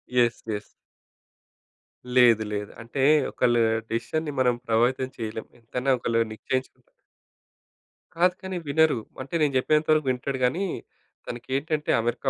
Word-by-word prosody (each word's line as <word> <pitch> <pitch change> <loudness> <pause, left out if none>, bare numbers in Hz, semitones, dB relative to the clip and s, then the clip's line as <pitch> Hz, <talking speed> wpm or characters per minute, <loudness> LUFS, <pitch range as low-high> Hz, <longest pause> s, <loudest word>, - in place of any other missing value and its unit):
Yes. 120 -1 +3
Yes. 105 0 -5 1.5
లేదు. 120 -3 +6
లేదు. 105 0 -4
అంటే 115 +4 -4 0.3
ఒకళ్ళ 120 -1 +2 0.4
డిసిషన్‌ని 150 +7 -2
మనం 125 -2 +3
ప్రభావితం 125 +3 +2
చేయలేం. 110 -1 -4
ఎంతైనా 125 +3 -2
ఒకళ్ళు 115 -1 0
నిశ్చయించుకుం 130 +5 -4 1.3
కాదు 180 +2 +3
కానీ 190 -1 -4
వినరు. 155 -2 +3 0.2
అంటే 135 +4 -10
నేను 145 -2 +2
చెప్పేంత 150 +4 +2
వరకు 155 -2 +3
వింటాడు 130 +1 -3
గానీ, 170 +11 0 0.6
తనకేంటంటే 140 +5 -2
అమెరికా 120 +3 -1
130 Hz, 115 wpm, -25 LUFS, 115-150 Hz, 1.5 s, లేదు